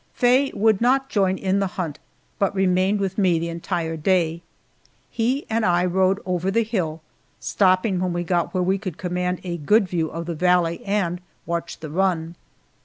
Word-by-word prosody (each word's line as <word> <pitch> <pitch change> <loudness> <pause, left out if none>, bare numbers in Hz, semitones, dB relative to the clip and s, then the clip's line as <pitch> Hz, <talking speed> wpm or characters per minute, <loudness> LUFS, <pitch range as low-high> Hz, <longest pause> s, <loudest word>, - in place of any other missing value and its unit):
Faye 255 +3 +3
would 220 -1 +2
not 270 +3 +2
join 190 -2 +1
in 190 +1 0
the 195 - +1
hunt, 160 -6 -3 0.4
but 200 0 +1
remained 190 +1 +2
with 195 0 -2
me 180 -4 +3
the 170 +1 -2
entire 165 -1 -3
day. 165 0 +1 0.7
He 250 +5 0
and 225 0 0
I 180 -2 +3
rode 190 +2 +2
over 180 0 -1
the 230 +4 +2
hill, 175 -8 -2 0.4
stopping 185 0 +2
when 180 0 -1
we 175 0 -2
got 175 0 0
where 185 -1 0
we 190 +2 +1
could 185 -6 -6
command 180 0 -2
a 175 -2 -4
good 200 +7 +3
view 165 -3 -1
of 165 +2 -6
the 170 - -3
valley 175 0 +1
and 190 -3 -1 0.2
watch 170 0 -4
the 155 -2 -7
run. 170 -2 0
185 Hz, 180 wpm, -23 LUFS, 170-195 Hz, 0.7 s, Faye